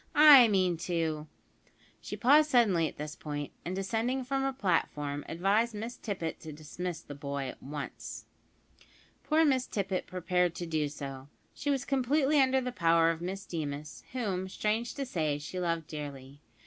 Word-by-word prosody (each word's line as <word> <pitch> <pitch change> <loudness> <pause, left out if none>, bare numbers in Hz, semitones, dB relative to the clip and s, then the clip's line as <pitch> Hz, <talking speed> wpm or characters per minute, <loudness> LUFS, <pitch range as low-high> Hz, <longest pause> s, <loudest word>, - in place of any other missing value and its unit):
I 290 -5 +10
mean 185 -5 +2
to 160 -3 -1 0.4
" - - -32
She - - -6
paused 295 +4 +5
suddenly 205 - +4
at - - -9
this 150 +2 -5
point, 145 -3 -5
and, 180 +2 -3
descending 225 +7 -1
from 270 +2 -1
her 270 0 +1
platform, 150 - -1
advised 205 +7 +1
Miss 225 +3 -5
Tippet 180 -7 -4
to 160 - -8
dismiss 160 +3 -6
the 145 - -9
boy 140 -1 -4
at - - -11
once. 145 +1 -7 1.0
Poor 315 +1 +3
Miss 260 -3 +2
Tippet 195 -2 -2
prepared 180 -1 0
to 175 - -4
do 155 -3 -1
so. 135 -2 -7 0.3
She 290 - -4
was 275 -2 0
completely 275 +2 +3
under 265 0 +3
the 250 0 -3
power 165 -4 +4
of 165 0 -6
Miss 195 +3 -4
Deemas, 150 -2 -5
whom, 190 -7 -2
strange 220 +4 -1
to 275 - -3
say, 155 - -1
she 150 +5 -6
loved 165 -2 -1
dearly. 145 -2 -8
180 Hz, 170 wpm, -30 LUFS, 150-240 Hz, 1.0 s, I